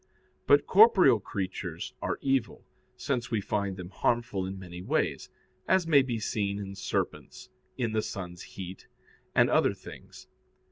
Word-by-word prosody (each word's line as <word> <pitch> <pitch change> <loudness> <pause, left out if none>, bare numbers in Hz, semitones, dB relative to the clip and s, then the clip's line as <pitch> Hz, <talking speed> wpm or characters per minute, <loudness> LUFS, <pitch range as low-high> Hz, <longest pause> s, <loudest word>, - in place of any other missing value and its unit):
But 145 - +5
corporeal 190 - +6
creatures 95 -1 -5
are - - -2
evil, 135 -5 0 0.3
since 125 -2 -2
we 115 - 0
find 100 -1 -2
them 90 0 -8
harmful 110 -6 0
in 95 +1 -6
many 90 -2 -9
ways; - - -1 0.4
as 190 -2 +3
may 150 -4 +6
be 120 -4 -2
seen 100 -2 -1
in 100 -1 -6
serpents, 95 -1 -4 0.3
in 120 -4 -1
the 110 0 +1
sun's 90 -4 -6 0.2
heat, 95 0 -8 0.5
and - - +5
other - - +3
things. - - -12
105 Hz, 145 wpm, -29 LUFS, 95-130 Hz, 0.5 s, corporeal